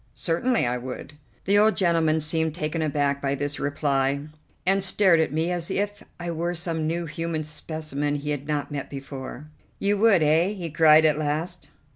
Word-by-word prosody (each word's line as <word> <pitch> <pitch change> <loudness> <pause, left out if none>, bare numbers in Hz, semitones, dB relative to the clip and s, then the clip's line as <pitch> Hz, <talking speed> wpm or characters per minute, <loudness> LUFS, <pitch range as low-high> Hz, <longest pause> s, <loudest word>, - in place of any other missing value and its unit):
"Certainly 220 - +1
I 125 +1 -1
would." 130 +3 -7 0.3
The 200 +2 +4
old 215 +1 +4
gentleman 165 -3 +2
seemed 160 0 +2
taken 160 -1 -2
aback 145 -2 0
by 140 0 0
this 145 +1 -3
reply, 140 -1 0 0.4
and 195 +1 +3
stared 190 -3 +4
at 160 - +1
me 160 +3 0
as 175 -2 -2
if 205 +1 -2 0.2
I 175 0 -4
were 170 +2 -2
some 165 -2 -2
new 170 +1 -1
human 165 0 -3
specimen 150 -1 -4
he 145 +1 -3
had 145 0 -4
not 145 -2 -2
met 140 -2 -4
before. 135 0 -8 0.3
"You 200 0 0
would, 205 -6 +5
eh?" 165 +6 +3
he 175 -6 -6
cried 155 0 +6
at 155 -1 +3
last. 155 +4 -2
155 Hz, 180 wpm, -25 LUFS, 145-175 Hz, 0.4 s, cried